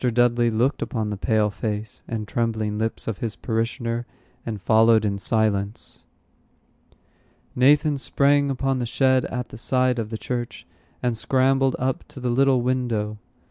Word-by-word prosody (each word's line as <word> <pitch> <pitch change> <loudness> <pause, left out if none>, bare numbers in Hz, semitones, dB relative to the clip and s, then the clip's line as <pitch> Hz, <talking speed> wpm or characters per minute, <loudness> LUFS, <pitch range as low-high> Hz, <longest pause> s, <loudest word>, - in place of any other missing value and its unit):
Dudley 120 -1 +2
looked 120 +5 0
upon 110 -3 -2
the - - -2
pale 105 +1 +1
face 105 +1 -5
and 110 -2 -4
trembling 110 -2 -1
lips 110 0 -3
of 115 -4 -3
his 110 -3 -3
parishioner, 115 +1 -2 0.4
and 110 -3 -5
followed 110 +1 +4
in 100 -1 -1
silence. 105 -1 -1 1.5
Nathan 145 +3 +4
sprang 140 +1 +2
upon 135 0 -1
the 120 - -2
shed 130 +1 +2
at 125 -1 -4
the - - -10
side 125 0 +1
of 110 -2 -3
the 110 - -4
church, 120 +1 -5 0.4
and 120 -2 +1
scrambled 135 +2 +2
up 130 +1 -1
to - - -11
the 125 -1 -2
little 135 0 +3
window. 115 -4 -1
Mr. - - -40
120 Hz, 155 wpm, -23 LUFS, 110-130 Hz, 1.5 s, followed